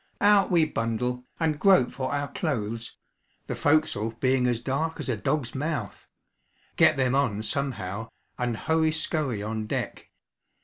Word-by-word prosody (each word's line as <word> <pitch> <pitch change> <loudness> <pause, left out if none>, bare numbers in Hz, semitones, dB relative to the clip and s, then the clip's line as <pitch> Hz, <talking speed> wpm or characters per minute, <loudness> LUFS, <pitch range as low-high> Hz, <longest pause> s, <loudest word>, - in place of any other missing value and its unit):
Out 205 -1 +5
we 170 -3 +4
bundle, 125 -1 -2
and 155 -3 0
grope 185 -9 +5
for 130 -1 -3
our 145 0 -1
clothes 115 -7 -3 0.5
(the - - -3
forecastle 145 -8 +1
being 130 -1 +2
as 120 -2 +1
dark 150 +6 -2
as - - -4
a 120 - +1
dog's 125 +4 -1
mouth), 140 - -4 0.7
get - - +5
them 130 -1 +2
on 120 -7 +1
somehow, 115 -4 -3 0.3
and 120 -2 -2
hurry 160 +3 +2
scurry 155 -8 -1
on 110 0 -3
deck. - - -4
130 Hz, 145 wpm, -27 LUFS, 115-155 Hz, 0.7 s, Out